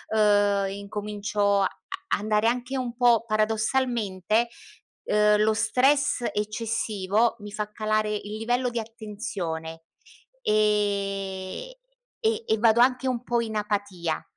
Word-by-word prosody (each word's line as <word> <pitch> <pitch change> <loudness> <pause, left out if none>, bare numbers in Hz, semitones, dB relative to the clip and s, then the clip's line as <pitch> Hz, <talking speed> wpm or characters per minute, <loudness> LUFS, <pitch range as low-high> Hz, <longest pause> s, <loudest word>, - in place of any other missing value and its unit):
uhm, 205 -2 +3
incomincio 200 0 -1
a 190 - +3 0.4
a - - +3
andare 215 +1 +1
anche 250 +2 -1
un 245 -2 -3
po' 240 -2 +4
paradossalmente, 220 -1 +1 0.6
uhm, 210 0 +3
lo 220 0 +3
stress 275 +3 +2
eccessivo 215 0 0
mi 205 0 -9
fa 210 0 -4
calare 215 0 0
il 210 +1 -5
livello 245 +3 0
di 235 -1 -3
attenzione, 200 -8 -6 0.6
ehm, 200 - 0 0.5
e 445 0 +1
e 220 - +2
vado 230 0 +4
anche 255 +1 +3
un 245 -2 -2
po' 240 -1 0
in 220 -1 -4
apatia. 200 -6 -2
215 Hz, 120 wpm, -26 LUFS, 205-235 Hz, 0.6 s, po